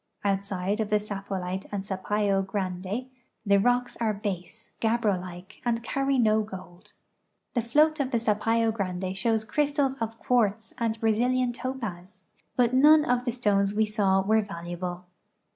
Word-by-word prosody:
Outside 200 0 -1
of 215 -2 -1
the 210 0 +3
Sapollite 195 -2 -4
and 200 -2 -3
Sapayo 195 +1 0
Grande 195 +3 -3 0.4
the 200 -1 +5
rocks 245 +3 +1
are 220 -3 0
base, 200 +2 -5
gabbro 220 -5 +1
like, 180 0 -10
and 235 -1 0
carry 275 +3 0
no 220 -3 +4
gold. 185 -4 -10 0.6
The 240 - +1
float 300 +7 +3
of 275 -2 0
the 240 - +1
Sapayo 225 +1 +1
Grande 185 -2 -3
shows 220 +3 +1
crystals 285 +1 0
of 225 -1 -4
quartz 225 -3 +1
and 225 -1 -1
Brazilian 240 +3 +2
topaz, 225 -8 -6 0.3
but 245 -1 +3
none 300 +3 +7
of 245 0 +1
the 240 - +1
stones 205 -4 +1
we 220 +1 +3
saw 200 -2 +2
were 220 +2 +3
valuable. 175 -2 -5
215 Hz, 150 wpm, -27 LUFS, 195-240 Hz, 0.6 s, none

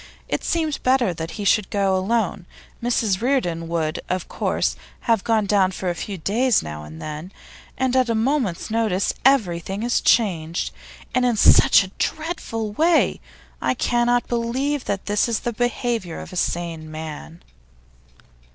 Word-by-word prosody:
It - - -2
seemed 320 -3 -1
better 255 -7 +2
that 165 0 -5
he 205 - -4
should 205 -1 +3
go 195 -2 +1
alone; 190 -2 -1 0.3
Mrs 225 -5 +1
Reardon 180 -11 0
would, 160 -2 -1
of 185 -1 -2
course, - - -1 0.3
have 225 -4 +1
gone 220 -2 +2
down 195 -2 +3
for 185 -1 -3
a - - -2
few 195 +3 -5
days 225 +7 +2
now 75 0 -7
and 75 +1 -10
then. 155 - -6 0.5
And 260 0 0
at 255 -2 +3
a 230 - +1
moment's 225 - 0
notice 215 -4 +1
everything 195 -6 +2
is 240 0 +1
changed, 170 -7 +1 0.4
and 255 - +2
in 245 -2 +2
such - - +6
a 190 - -9
dreadful 310 -9 -3
way! 325 +9 +2 0.4
I - - +1
cannot 240 0 +1
believe 255 +4 -1
that 200 -1 -3
this 205 +3 +1
is 230 - 0
the 240 - -2
behaviour 235 -6 -2
of - - -9
a - - -7
sane 170 -3 -2
man! 150 - -8
210 Hz, 160 wpm, -22 LUFS, 175-245 Hz, 0.5 s, such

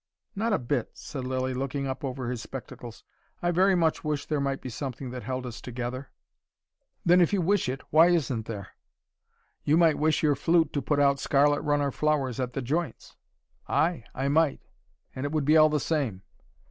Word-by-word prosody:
"Not 225 +3 0
a 205 - +3
bit," 125 0 -2
said 130 -3 -7
Lilly, 130 0 -1
looking 135 +2 -3
up 135 +1 -4
over 130 -2 -4
his 120 -2 -4
spectacles. 120 -3 -9 0.4
"I 175 - 0
very 190 +2 +4
much 165 -3 +1
wish 150 -2 -2
there 150 -2 -1
might 140 -1 -1
be 130 - -7
something 130 +1 -5
that 125 0 -6
held 130 0 -4
us 120 -2 -7
together." 125 +2 -5 1.0
"Then 180 +1 +6
if 170 - +3
you 200 - +2
wish 185 -4 +1
it, 135 +2 -4
why 160 +3 +7
isn't 140 -10 0
there?" 100 -5 -6 0.9
"You 150 +2 +3
might 165 -3 +4
wish 155 +1 +2
your 150 -1 +4
flute 165 +2 +2
to 145 - 0
put 145 0 0
out 140 -1 +3
scarlet 145 +1 +3
runner 145 -2 +1
flowers 140 -5 0
at 125 -1 -2
the 135 - -3
joints." 160 +7 -3 0.5
"Ay 165 -5 +1
I 135 +1 -1
might. 150 0 +2 0.5
And 130 - -4
it 145 - -2
would 155 -3 0
be 155 +2 +4
all 155 -1 +7
the 150 0 +1
same." 130 - -2
140 Hz, 195 wpm, -27 LUFS, 130-155 Hz, 1.0 s, why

